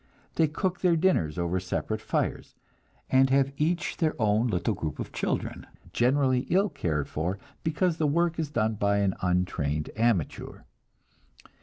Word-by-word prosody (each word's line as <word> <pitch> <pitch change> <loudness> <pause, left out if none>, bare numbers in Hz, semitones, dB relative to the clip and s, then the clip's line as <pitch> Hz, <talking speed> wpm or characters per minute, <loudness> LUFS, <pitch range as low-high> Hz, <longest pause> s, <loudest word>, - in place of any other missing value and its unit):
They 160 - +3
cook 180 +4 -2
their 180 -2 +3
dinners 155 - +1
over 85 +1 0
separate 110 +4 -3
fires, - - -2 0.6
and 130 0 +5
have 135 0 +2
each 170 +5 -1
their 155 -4 0
own 110 +2 +2
little 110 +1 0
group 80 -6 -4
of - - -5
children, - - -3 0.3
generally 130 0 +2
ill 195 +4 +3
cared 75 - -2
for, 85 +6 -2 0.3
because 165 +1 0
the 155 - +1
work 170 +2 +1
is 155 -3 -1
done 110 -5 0
by 100 -1 +1
an 100 -2 +2
untrained 90 -5 -1
amateur. 110 -8 -1
120 Hz, 150 wpm, -27 LUFS, -, 0.6 s, and